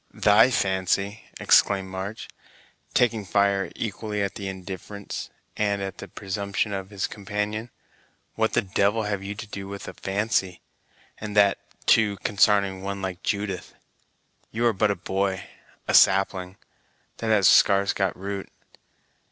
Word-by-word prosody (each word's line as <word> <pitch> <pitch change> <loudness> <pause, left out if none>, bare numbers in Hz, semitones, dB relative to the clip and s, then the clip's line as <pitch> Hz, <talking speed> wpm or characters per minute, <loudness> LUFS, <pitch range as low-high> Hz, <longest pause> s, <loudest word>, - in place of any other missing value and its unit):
"Thy 105 +4 +5
fancy!" 100 -1 0
exclaimed 95 -2 +4
March, 95 +4 -6 0.7
taking 115 -3 +2
fire 100 0 +1
equally 105 -1 -3
at 100 - -2
the 100 - -6
indifference 95 +1 -7 0.3
and 100 -1 0
at 95 0 -5
the 100 - -7
presumption 100 +2 -3
of 95 -1 -4
his 100 -2 -2
companion, 105 +2 -4 0.6
"what - - 0
the - - +2
devil 100 +3 +1
have 100 -2 -2
you 100 +1 -5
to 110 - -7
do 100 -2 -7
with 100 0 -7
a - - -6
fancy, 95 -2 -1 0.6
and 105 -1 -5
that, 100 -1 +5 0.3
too, 105 -3 +4
consarning 100 -2 +3
one 100 0 -4
like 95 -1 -4
Judith? 100 -2 -3 0.7
You 115 +2 -1
are 115 - +4
but 105 +2 +2
a 100 - +1
boy 95 +1 -2 0.4
a - - 0
sapling, 95 -1 +4 0.6
that 115 - -4
has 105 -4 +4
scarce 100 0 +5
got 95 -1 -1
root. 100 +1 -5
100 Hz, 145 wpm, -25 LUFS, 95-105 Hz, 0.7 s, Thy